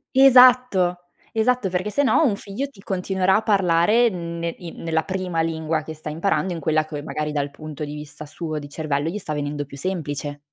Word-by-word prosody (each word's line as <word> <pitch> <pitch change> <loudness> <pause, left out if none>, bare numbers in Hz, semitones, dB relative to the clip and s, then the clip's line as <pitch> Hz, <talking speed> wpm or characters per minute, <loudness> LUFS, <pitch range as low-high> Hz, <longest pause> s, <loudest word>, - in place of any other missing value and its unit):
Esatto, 250 -8 +6 0.3
esatto, 225 -2 +1
perché 185 +3 -1
sennò 285 +7 +3
un 220 -8 +2
figlio 205 +9 -4
ti 210 -8 -18
continuerà 190 0 +1
a - - 0
parlare 200 +3 +3
ne 170 -3 -4
i 170 -2 -8
nella 160 -1 -2
prima 185 -3 -2
lingua 160 -1 -1
che 160 - -7
sta 155 0 -8
imparando, 180 +3 0
in 170 - -5
quella 155 0 +1
c 150 -2 -6
magari 150 -1 -3
dal 145 -1 -1
punto 155 +1 -8
di 145 0 -5
vista 150 0 -9
suo, 155 +1 -5
di 145 -1 -7
cervello, 150 0 -2
gli 190 - -4
sta 155 -7 -5
venendo 145 0 -3
più 140 0 -11
semplice. 145 -4 -4
170 Hz, 195 wpm, -23 LUFS, 150-195 Hz, 0.3 s, Esatto